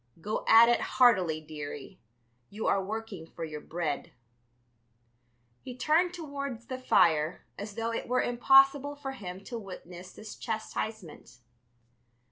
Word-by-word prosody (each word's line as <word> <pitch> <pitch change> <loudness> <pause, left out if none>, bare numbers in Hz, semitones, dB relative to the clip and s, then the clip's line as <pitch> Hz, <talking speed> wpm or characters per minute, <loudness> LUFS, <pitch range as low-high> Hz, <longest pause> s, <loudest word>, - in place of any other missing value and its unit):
Go 210 +6 -3
at 225 +1 +8
it 240 - +3
heartily, 185 -11 +3
dearie; 150 -2 -8 0.5
you 215 +2 -6
are 195 - +2
working 210 -4 -6
for 165 - -8
your 155 -2 -6
bread." 160 -3 -4 1.5
He 250 -1 -9
turned 320 +7 +2
towards 280 -8 -6
the 255 +2 -6
fire, 160 -9 +2
as 205 0 -7
though 230 0 -2
it - - -4
were 250 +1 +1
impossible 270 +3 +4
for 280 -2 -6
him 190 -6 -8
to 235 +2 -6
witness 180 -3 -10
this 215 0 -10
chastisement. 220 - -5
220 Hz, 130 wpm, -29 LUFS, 175-255 Hz, 1.5 s, at